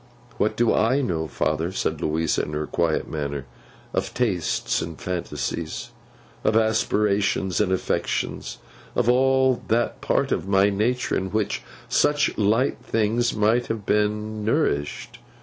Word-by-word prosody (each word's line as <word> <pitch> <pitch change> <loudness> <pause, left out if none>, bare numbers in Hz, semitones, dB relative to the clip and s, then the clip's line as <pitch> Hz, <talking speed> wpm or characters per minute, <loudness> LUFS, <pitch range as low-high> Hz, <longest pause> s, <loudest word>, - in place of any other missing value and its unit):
'What - - +1
do 120 -1 +3
I 130 +6 +3
know, 80 - -1
father,' 80 +3 -1
said 95 - -2
Louisa 80 +1 +1
in 75 - -5
her 75 0 -1
quiet 80 -1 0
manner, 70 -3 -4 0.5
'of - - -2
tastes 100 -10 0
and 85 -1 -6
fancies; 85 -2 -4 0.5
of 110 - +2
aspirations 105 -4 +1
and 95 - +1
affections; 95 - -2 0.4
of - - +1
all 130 0 +3
that 120 +2 0
part - - +1
of - - -1
my 100 +1 +4
nature 120 +5 0
in 95 - -1
which 105 +1 -1 0.3
such 150 0 +2
light 110 +5 +2
things 115 +2 0
might 110 +3 +2
have 110 -3 -4
been 105 +1 0
nourished? 105 - -1
105 Hz, 135 wpm, -24 LUFS, 85-115 Hz, 0.5 s, my